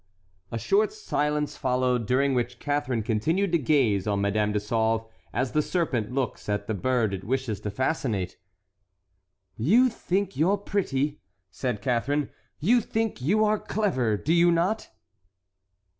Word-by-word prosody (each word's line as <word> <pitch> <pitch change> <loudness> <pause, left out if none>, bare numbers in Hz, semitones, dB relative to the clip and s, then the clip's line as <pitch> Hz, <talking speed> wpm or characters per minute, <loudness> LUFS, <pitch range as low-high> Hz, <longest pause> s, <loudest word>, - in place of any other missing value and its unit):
A 115 - -2
short 200 - +2
silence 150 - -1
followed, 125 -4 0
during 135 +3 +2
which 120 -1 -1
Catharine 130 -5 -1
continued 160 - 0
to 170 - +3
gaze 120 -9 +2
on 100 -1 +1
Madame 105 +1 +1
de 105 - +1
Sauve 110 +1 0 0.3
as 125 +2 -1
the 150 - +2
serpent 145 - -1
looks 130 -4 -3
at 105 0 -1
the 110 - -2
bird 115 0 0
it 95 0 -5
wishes 125 -3 -2
to 105 - -4
fascinate. 105 - -2 1.2
"You 225 - +4
think 195 -3 -2
you 160 +5 +2
are 200 - +3
pretty," 150 -8 -1 0.3
said 120 -3 -3
Catharine, 135 +3 0 0.3
"you 235 +10 +4
think 225 - -2
you 210 +11 +3
are 210 0 +2
clever, 130 - 0
do 155 +10 0
you 175 0 +5
not?" 180 +6 0
130 Hz, 150 wpm, -26 LUFS, 110-170 Hz, 1.2 s, you